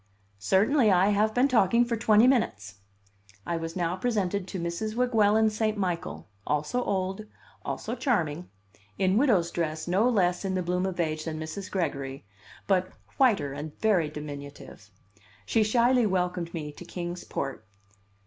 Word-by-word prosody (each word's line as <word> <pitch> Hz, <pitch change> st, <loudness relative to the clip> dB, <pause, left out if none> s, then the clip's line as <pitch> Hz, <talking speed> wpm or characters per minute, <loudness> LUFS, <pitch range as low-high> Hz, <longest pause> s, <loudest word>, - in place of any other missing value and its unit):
"Certainly. 215 Hz, -, +3 dB
I 185 Hz, +2 st, +4 dB
have 210 Hz, +1 st, +2 dB
been 250 Hz, +3 st, +4 dB
talking 235 Hz, -2 st, +3 dB
for 235 Hz, -1 st, -1 dB
twenty 220 Hz, 0 st, +4 dB
minutes." 105 Hz, -, +1 dB, 0.7 s
I 170 Hz, -, -2 dB
was 165 Hz, 0 st, -4 dB
now 175 Hz, -1 st, -1 dB
presented 200 Hz, -3 st, -1 dB
to 190 Hz, -, -5 dB
Mrs. 170 Hz, +6 st, -3 dB
Weguelin 220 Hz, -3 st, +3 dB
St. 215 Hz, 0 st, -1 dB
Michael, 180 Hz, -3 st, -3 dB, 0.2 s
also 150 Hz, +12 st, 0 dB
old, 190 Hz, +1 st, -2 dB, 0.4 s
also 225 Hz, -, -4 dB
charming, 180 Hz, -, -1 dB, 0.5 s
in 190 Hz, 0 st, +2 dB
widow's 200 Hz, -12 st, +3 dB
dress 160 Hz, -1 st, -3 dB
no 200 Hz, +7 st, +3 dB
less 180 Hz, -6 st, +1 dB
in 190 Hz, -1 st, -1 dB
the 185 Hz, -, -1 dB
bloom 180 Hz, +2 st, 0 dB
of 185 Hz, -2 st, -5 dB
age 155 Hz, -2 st, -1 dB
than 155 Hz, -1 st, -4 dB
Mrs. 160 Hz, +6 st, -6 dB
Gregory, 140 Hz, -, -3 dB, 0.4 s
but 185 Hz, -2 st, +1 dB, 0.3 s
whiter 205 Hz, -, +3 dB
and 145 Hz, +2 st, -7 dB
very 190 Hz, -8 st, +2 dB
diminutive. 145 Hz, -7 st, -9 dB, 0.6 s
She 225 Hz, -, +2 dB
shyly 235 Hz, +2 st, +3 dB
welcomed 180 Hz, -2 st, -1 dB
me 150 Hz, -3 st, -5 dB
to 145 Hz, -, -11 dB
Kings 175 Hz, 0 st, -6 dB
Port. 135 Hz, -5 st, -4 dB
185 Hz, 150 wpm, -27 LUFS, 165-215 Hz, 0.7 s, I